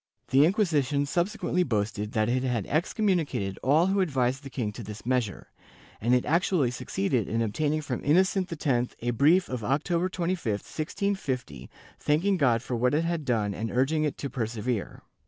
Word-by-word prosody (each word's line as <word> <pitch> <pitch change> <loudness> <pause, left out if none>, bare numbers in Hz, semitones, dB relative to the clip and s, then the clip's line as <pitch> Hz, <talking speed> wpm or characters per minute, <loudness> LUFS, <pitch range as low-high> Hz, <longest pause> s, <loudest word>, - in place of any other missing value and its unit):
^ - - -29
The 135 +3 +6
Inquisition 150 - +1
subsequently 180 +3 0
boasted 105 -6 -1
that 110 -2 +1
it 125 +2 +1
had 125 -6 -1
excommunicated 165 - 0
all 150 +6 +4
who 195 +1 +1
advised 135 -6 0
the 140 - -9
king 120 -5 -3
to 110 - -9
this 105 0 -9
measure, 125 -6 -1 0.5
and 120 +4 +3
it 125 - +1
actually 165 -5 +2
succeeded 120 -2 -1
in 115 - 0
obtaining 145 +8 0
from 135 -5 -4
Innocent 185 +4 +2
X 125 -4 +1
a 120 +1 0
brief 155 +10 +4
of 125 -3 -4
October 170 - 0
25, 170 - -1
1650, 135 - -3 0.3
thanking 185 +7 +2
God 120 -7 +2
for 125 - -3
what 125 +4 +2
it 160 - +2
had 165 -3 -2
done 110 -5 0
and 110 +3 -3
urging 135 +6 +1
it 150 - -1
to 140 - -4
persevere. 115 -2 -3
135 Hz, 175 wpm, -27 LUFS, 115-165 Hz, 0.5 s, The